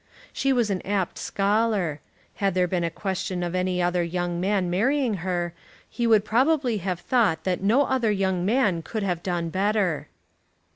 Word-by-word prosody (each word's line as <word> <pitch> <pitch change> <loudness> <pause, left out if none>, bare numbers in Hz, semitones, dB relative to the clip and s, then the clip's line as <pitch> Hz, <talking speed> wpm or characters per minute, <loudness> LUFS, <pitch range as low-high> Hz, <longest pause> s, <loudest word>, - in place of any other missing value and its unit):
She 275 - +1
was 240 -5 +2
an 185 - -1
apt 195 -2 -2
scholar. 200 -6 0 0.4
Had 195 -2 0
there 180 -1 +2
been 175 -1 -1
a 170 - 0
question 185 0 -3
of 175 0 -3
any 180 -1 0
other 175 0 +1
young 175 0 -2
man 195 -1 +1
marrying 230 +5 +1
her, 175 -1 -2 0.3
he 240 -1 -2
would 215 -2 +4
probably 255 +1 +2
have 185 -1 -3
thought 200 -7 +1
that 185 -1 -1
no 225 +8 +4
other 260 -4 +1
young 190 -3 0
man 205 -5 +2
could 215 +5 -4
have 180 -3 -1
done 175 -2 -2
better. 195 -3 0
190 Hz, 175 wpm, -25 LUFS, 175-220 Hz, 0.4 s, would